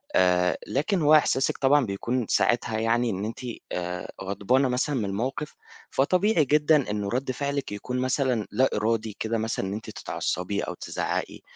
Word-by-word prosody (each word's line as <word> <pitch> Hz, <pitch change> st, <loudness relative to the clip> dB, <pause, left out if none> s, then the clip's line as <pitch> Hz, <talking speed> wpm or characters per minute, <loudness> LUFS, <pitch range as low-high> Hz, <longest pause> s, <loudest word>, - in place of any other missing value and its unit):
آآ، 90 Hz, -1 st, +3 dB
لكن 170 Hz, +6 st, 0 dB
هو 150 Hz, +1 st, +6 dB
إحساسِك 135 Hz, -3 st, +2 dB
طبعًا 140 Hz, -1 st, +4 dB
بيكون 115 Hz, +5 st, -2 dB
ساعتها 120 Hz, -2 st, +2 dB
يعني 115 Hz, +1 st, +2 dB
إن 100 Hz, 0 st, -2 dB
أنتِ 115 Hz, -, -5 dB, 0.3 s
آآ، 90 Hz, 0 st, -4 dB
غضبانة 105 Hz, +8 st, +1 dB
مثلًا 130 Hz, +4 st, 0 dB
من 110 Hz, -5 st, 0 dB
الموقِف، 125 Hz, +9 st, -3 dB, 0.3 s
فطبيعي 180 Hz, +3 st, +2 dB
جدًا 150 Hz, -2 st, +3 dB
إنه 105 Hz, -1 st, -2 dB
رَد 130 Hz, +3 st, -1 dB
فعلِك 140 Hz, +1 st, -2 dB
بيكون 125 Hz, +5 st, -3 dB
مثلًا 130 Hz, -4 st, 0 dB
لا 130 Hz, +1 st, +3 dB
إرادي 110 Hz, -1 st, -1 dB
كده، 115 Hz, +1 st, -1 dB
مثلًا 110 Hz, -3 st, -2 dB
إن 95 Hz, -, -3 dB
أنتِ 110 Hz, -, -6 dB
تتعصبي 90 Hz, +3 st, -3 dB
أو -, -, -4 dB
تزعّقي -, -, -3 dB
120 Hz, 160 wpm, -26 LUFS, 105-140 Hz, 0.3 s, هو